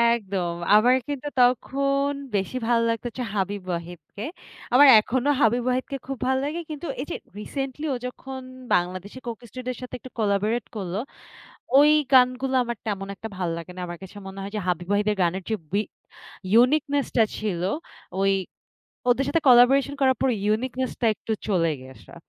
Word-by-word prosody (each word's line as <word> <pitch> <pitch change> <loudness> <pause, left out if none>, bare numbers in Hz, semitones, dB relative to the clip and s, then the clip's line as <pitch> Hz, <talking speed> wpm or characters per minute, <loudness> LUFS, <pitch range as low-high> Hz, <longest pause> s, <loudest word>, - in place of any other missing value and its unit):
একদম! 190 -6 -3 0.2
আমার 240 +4 +6
কিন্তু 285 -1 -4
তখন 275 +3 +2 0.3
বেশি 200 +6 -1
ভাল্লাগত 230 -1 +1
হচ্ছে 245 +1 -5
হাবিব 200 +1 -1
ওয়াহিদকে। 170 +2 -6 0.5
আমার 280 +3 +8
এখনো 255 +5 0
হাবিব 240 0 +3
ওয়াহিদকে 255 +2 -1
খুব 270 -1 -4
ভাল্লাগে 275 +5 0
কিন্তু, 305 +2 -5
এই - - -4
যে - - -2 0.2
রিসেন্টলি 270 +6 -4
ও - - -1
যখন 260 +1 -8 0.3
বাংলাদেশী 185 +6 -2
'Coke 235 0 -6
Studio' 255 +2 -5
র - - -14
সাথে 250 - -6
একটু 260 - -12
কোলাবোরেট 210 +2 +1
করলো, 195 -1 -3 0.8
ওই 295 +1 +7 0.2
গানগুলা 255 +1 +4
আমার 235 0 -4
তেমন 195 -2 -2
একটা 220 +3 -7
ভাল্লাগেনা। 175 +1 -4
আমার 175 0 -7
কাছে 190 +2 -11
মনে 195 0 -8
হয় 195 - -5
যে - - -1
হাবিব 175 0 -1
ওয়াহিদ 205 +1 +2
এর 210 - -4
গানের 180 +2 0
যে - - +2 0.2
বি 200 - +2 0.7
ইউনিকনেস 280 +4 +4
টা 230 - +6 0.2
ছিল 195 -5 -2 0.6
ওই 195 0 +3 0.8
ওদের 255 +3 +3
সাথে 330 - +2
কোলাবোরেশন 260 +3 +6
করার 260 -1 +4
পরে 265 - +3
ইউনিকনেস 250 +4 0
টা 235 - +2
একটু 220 - -5 0.2
চলে 170 -5 +2
গিয়েছে। 130 0 -14
235 Hz, 160 wpm, -25 LUFS, 195-260 Hz, 0.8 s, আমার